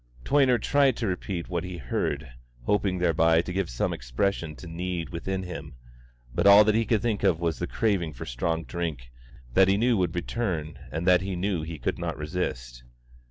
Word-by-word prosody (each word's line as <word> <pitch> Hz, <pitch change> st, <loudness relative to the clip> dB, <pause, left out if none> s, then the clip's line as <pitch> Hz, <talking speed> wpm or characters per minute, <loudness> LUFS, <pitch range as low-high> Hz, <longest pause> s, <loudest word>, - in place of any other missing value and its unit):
Toyner 135 Hz, -3 st, +4 dB
tried 135 Hz, +2 st, +3 dB
to 115 Hz, -, -2 dB
repeat 90 Hz, -2 st, -3 dB
what 85 Hz, -2 st, -2 dB
he 90 Hz, -1 st, -6 dB
heard, 70 Hz, +1 st, -2 dB, 0.3 s
hoping 100 Hz, +4 st, +1 dB
thereby 80 Hz, -1 st, +3 dB
to 90 Hz, -, -5 dB
give 95 Hz, -2 st, -1 dB
some -, -, -1 dB
expression 75 Hz, +6 st, -2 dB
to 90 Hz, -, -11 dB
the 80 Hz, -, -8 dB
need 90 Hz, -1 st, -3 dB
within 95 Hz, +3 st, -3 dB
him; 90 Hz, -7 st, -7 dB, 0.6 s
but -, -, +2 dB
all 100 Hz, +1 st, +9 dB
that 105 Hz, 0 st, +3 dB
he 115 Hz, +1 st, +2 dB
could 110 Hz, -1 st, +1 dB
think 110 Hz, -4 st, 0 dB
of 95 Hz, -5 st, +3 dB
was 85 Hz, -2 st, -1 dB
the 90 Hz, -, -2 dB
craving 100 Hz, -9 st, 0 dB
for 60 Hz, -, -7 dB
strong 80 Hz, +7 st, -2 dB
drink 80 Hz, -10 st, -4 dB, 0.4 s
that 95 Hz, +5 st, +6 dB
he 95 Hz, +1 st, +3 dB
knew 120 Hz, +2 st, +3 dB
would 90 Hz, -2 st, 0 dB
return 85 Hz, -, -3 dB
and 80 Hz, +3 st, -3 dB
that 90 Hz, -1 st, +5 dB
he 95 Hz, 0 st, -3 dB
knew 90 Hz, -1 st, -1 dB
he 80 Hz, +1 st, -6 dB
could -, -, -2 dB
not -, -, -3 dB
resist. 60 Hz, -7 st, -4 dB
90 Hz, 200 wpm, -27 LUFS, 80-100 Hz, 0.6 s, all